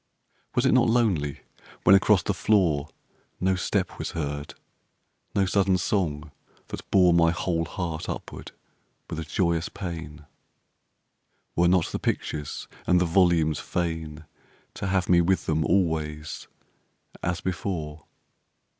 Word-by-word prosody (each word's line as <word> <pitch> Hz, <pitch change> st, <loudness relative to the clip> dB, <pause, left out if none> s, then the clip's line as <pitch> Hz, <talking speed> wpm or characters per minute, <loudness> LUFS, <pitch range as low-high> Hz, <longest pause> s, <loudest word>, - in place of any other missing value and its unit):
Was 125 Hz, -, +2 dB
it 130 Hz, -, +4 dB
not 125 Hz, -2 st, +4 dB
lonely 95 Hz, -, +1 dB, 0.4 s
when 90 Hz, -, +7 dB
across 95 Hz, -1 st, +4 dB
the 100 Hz, -, 0 dB
floor 90 Hz, -7 st, +2 dB, 0.5 s
No 95 Hz, +1 st, +2 dB
step 95 Hz, -, -1 dB
was -, -, -4 dB
heard, 70 Hz, -2 st, -4 dB, 0.8 s
no 100 Hz, -, +3 dB
sudden 95 Hz, 0 st, +2 dB
song 80 Hz, -6 st, -1 dB, 0.4 s
that -, -, -8 dB
bore 90 Hz, -3 st, +5 dB
My 85 Hz, -1 st, +5 dB
whole 85 Hz, 0 st, -1 dB
heart 85 Hz, -3 st, -4 dB
upward -, -, -7 dB, 0.6 s
with -, -, -5 dB
a -, -, -3 dB
joyous 85 Hz, +1 st, 0 dB
pain? 80 Hz, -5 st, -7 dB, 1.3 s
Were 85 Hz, +1 st, +4 dB
not 90 Hz, -1 st, +2 dB
the -, -, -3 dB
pictures 75 Hz, -2 st, -3 dB, 0.2 s
and 90 Hz, -, +5 dB
the 90 Hz, -, +2 dB
volumes 85 Hz, -3 st, +3 dB
fain 80 Hz, -3 st, -3 dB, 0.5 s
To 100 Hz, -, -4 dB
have 95 Hz, -2 st, +1 dB
me 90 Hz, -1 st, +5 dB
with 95 Hz, +2 st, +1 dB
them 80 Hz, 0 st, +1 dB
always 80 Hz, -4 st, -1 dB, 0.7 s
as 85 Hz, -1 st, -1 dB
before? 85 Hz, -5 st, -4 dB
85 Hz, 130 wpm, -26 LUFS, 80-95 Hz, 1.3 s, when